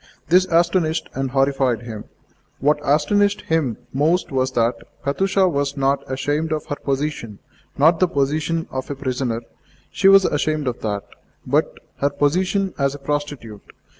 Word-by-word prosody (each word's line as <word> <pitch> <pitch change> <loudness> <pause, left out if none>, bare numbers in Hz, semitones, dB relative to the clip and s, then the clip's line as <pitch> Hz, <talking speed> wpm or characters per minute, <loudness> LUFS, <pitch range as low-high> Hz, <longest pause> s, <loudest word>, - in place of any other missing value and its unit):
This 180 +2 +5
astonished 170 -1 +1
and 135 0 -2
horrified 135 -3 +1
him. 110 -3 -7 0.5
What 150 +2 +2
astonished 200 +9 +2
him 150 -9 0 0.2
most 155 +7 +1
was 130 -1 0
that 120 0 +2 0.3
Katusha 190 +6 +2
was 140 -4 -1
not 135 0 +1
ashamed 145 +4 -1
of 155 -1 -2
her 145 - -3
position 135 -7 -3 0.4
not 160 +4 +4
the 185 - +4
position 155 +2 -1
of 130 0 -4
a 145 - -3
prisoner 130 -3 -2 0.5
(she 195 - +2
was 195 -1 +7
ashamed 155 0 0
of 125 -1 -2
that), 100 -2 -3 0.4
but - - +1 0.2
her 140 - +1
position 185 +7 0
as 140 0 +1
a - - -7
prostitute. 140 -7 -4
145 Hz, 150 wpm, -21 LUFS, 135-165 Hz, 0.5 s, was